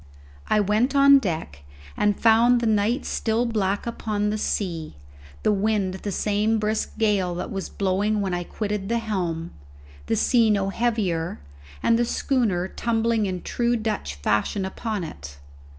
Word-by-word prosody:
I 215 - +3
went 215 +7 +1
on 280 0 +7
deck 160 - -4 0.3
and 205 -1 +1
found 235 +2 +5
the 235 - -2
night 220 +4 +1
still 225 +2 0
black 205 -4 -1
upon 210 -3 -2
the 215 - -1
sea, 170 - -2 0.5
the - - +3
wind 205 -2 0
the 195 +2 -5
same 210 +3 +1
brisk 215 +1 -2
gale 200 -5 +1
that 175 - -5
was 195 -1 -4
blowing 200 +2 0
when 195 -2 -1
I 175 0 -1
quitted 205 +1 -4
the 235 - +1
helm, 180 -7 -3 0.6
the - - +1
sea 235 - +3
no 200 -2 +1
heavier, 195 - -1 0.4
and 230 0 +3
the 240 - +2
schooner 225 -8 0
tumbling 225 0 0
in 185 -2 -4
true 240 0 0
Dutch 215 - -3
fashion 105 - 0
upon 210 +1 -4
it. 70 - -9
210 Hz, 155 wpm, -24 LUFS, 185-225 Hz, 0.6 s, on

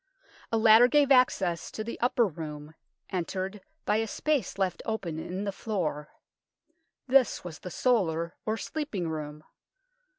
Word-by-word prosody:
A 225 - +2
ladder 220 +2 +7
gave 285 +1 +3
access 195 -10 +3
to 215 - -5
the 230 - -6
upper 245 -1 +3
room, 150 -4 -7 0.4
entered 190 +2 -3 0.2
by 210 - +2
a 225 0 0
space 295 -1 -1
left 190 -3 -1
open 180 -8 -3
in 185 +4 -4
the 200 - -2
floor. 175 -9 -3 1.0
This 260 -3 +3
was 170 -3 -8
the 180 - -7
solar, 170 -7 +1
or 220 +1 -1
sleeping 250 - -3
room. 150 -1 -6
195 Hz, 140 wpm, -28 LUFS, 165-230 Hz, 1.0 s, ladder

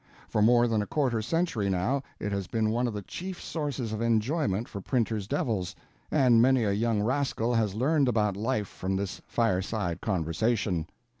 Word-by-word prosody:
For 105 - 0
more 120 +2 +5
than 110 -2 +1
a 105 - -4
quarter 130 -7 0
century 125 - 0
now 95 +10 0 0.2
it 105 - -3
has 100 -2 -2
been 110 -1 0
one 120 +2 +1
of 115 - -3
the 105 - -4
chief 185 - -6
sources 140 -8 -3
of 110 - -3
enjoyment 115 - +1
for 100 - -7
printers' 110 -3 -1
devils; 115 - -1 0.3
and 125 -6 +5
many 130 0 +4
a 105 - +1
young 105 0 +1
rascal 125 -1 0
has 110 -4 +1
learned 140 +4 +2
about 105 -4 +1
life 110 0 -1
from 95 +2 -3
this 100 0 -3
Fireside 95 -5 0
Conversation. 95 -1 0
110 Hz, 175 wpm, -28 LUFS, 100-125 Hz, 0.3 s, more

